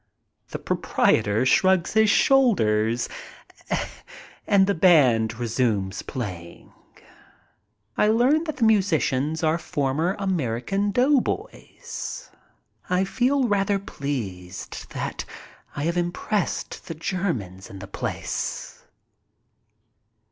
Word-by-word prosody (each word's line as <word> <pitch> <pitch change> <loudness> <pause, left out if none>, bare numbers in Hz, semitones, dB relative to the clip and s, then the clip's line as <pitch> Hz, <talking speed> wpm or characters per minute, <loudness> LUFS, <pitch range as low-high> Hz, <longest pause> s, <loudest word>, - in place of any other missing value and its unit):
The - - -4
proprietor 105 +4 +1
shrugs 185 +5 +3
his 220 -1 +4
shoulders 120 - +3 1.4
and 195 -1 +5
the 200 - +1
band 130 - +4
resumes 110 -5 -1
playing. 90 -9 -7 1.2
I 210 - +3
learn 255 +9 +3
that 310 -3 -4
the 245 - 0
musicians 160 -8 +2
are 160 +1 +2
former 160 +2 -1
American 190 - -1
doughboys. 275 - -2 0.6
I 180 +1 +2
feel 255 +6 +1
rather 200 -1 +1
pleased 105 - -6
that - - -4 0.5
I 145 - -3
have 170 +3 0
impressed 175 +3 -2
the 165 - -5
Germans 150 - -3
in 100 - -9
the 95 - -8
place. 95 - -4
165 Hz, 95 wpm, -24 LUFS, -, 1.4 s, and